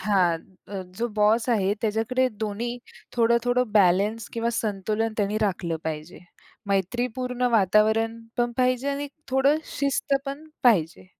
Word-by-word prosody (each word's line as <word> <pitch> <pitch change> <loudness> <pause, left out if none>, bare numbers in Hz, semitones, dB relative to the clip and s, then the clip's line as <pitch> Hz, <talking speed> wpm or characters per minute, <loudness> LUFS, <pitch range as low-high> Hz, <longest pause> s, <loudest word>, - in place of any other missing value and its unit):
हां. 185 -5 +2 0.3
अ, 195 -2 -5 0.2
जो 235 - +1
बॉस 220 +3 +3
आहे 200 -4 +2
त्याच्याकडे 225 +4 +1 0.2
दोन्ही 235 +4 -3 0.4
थोडं-थोडं 235 0 +2
बॅलन्स 205 +3 +3
किंवा 230 0 -1
संतुलन 215 0 -1
त्यांनी 210 0 0
राखलं 180 -5 -1
पाहिजे. 155 +1 -5 0.5
मैत्रीपूर्ण 245 +6 -1
वातावरण 220 +2 +3 0.2
पण 240 0 +1
पाहिजे 255 +1 +1
आणि 280 +1 -2
एक 285 - -10 0.2
थोडं 270 +3 +4 0.2
शिस्त 280 +1 0
पण 280 +3 -5 0.2
पाहिजे. 180 -8 +2
225 Hz, 130 wpm, -25 LUFS, 200-245 Hz, 0.5 s, थोडं